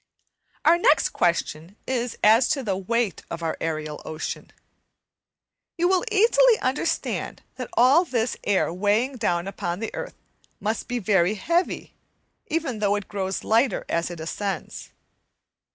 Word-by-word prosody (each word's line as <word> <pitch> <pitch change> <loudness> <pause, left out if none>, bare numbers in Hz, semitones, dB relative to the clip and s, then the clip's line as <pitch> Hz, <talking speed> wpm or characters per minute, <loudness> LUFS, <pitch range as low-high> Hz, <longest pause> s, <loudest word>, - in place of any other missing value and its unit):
Our 340 +2 +6
next 310 -3 +4
question 170 +1 -1
is 245 -2 -2
as 225 +4 +6
to 275 - 0
the 200 -5 -1
weight 215 +1 -1
of 170 0 -6
our 165 - -1
aerial 155 -2 -3
ocean. 155 0 -6 1.3
You 345 +1 +2
will 370 0 +2
easily 460 +3 +5
understand 295 +6 -2
that 255 -2 -5
all 265 +8 +5
this 245 -8 -1
air 190 -4 +1
weighing 210 +8 +1
down 175 -5 0
upon 175 -3 -3
the 225 - -4
earth - - -6 0.4
must 215 +1 -2
be 245 - -2
very 195 -2 +2
heavy, 340 - -1 0.5
even 300 -8 -2
though 205 -1 +2
it 205 -1 -4
grows 190 -2 -3
lighter 225 0 +2
as 170 0 0
it 175 -2 -8
ascends. 185 +2 -4
215 Hz, 140 wpm, -24 LUFS, 180-260 Hz, 1.3 s, Our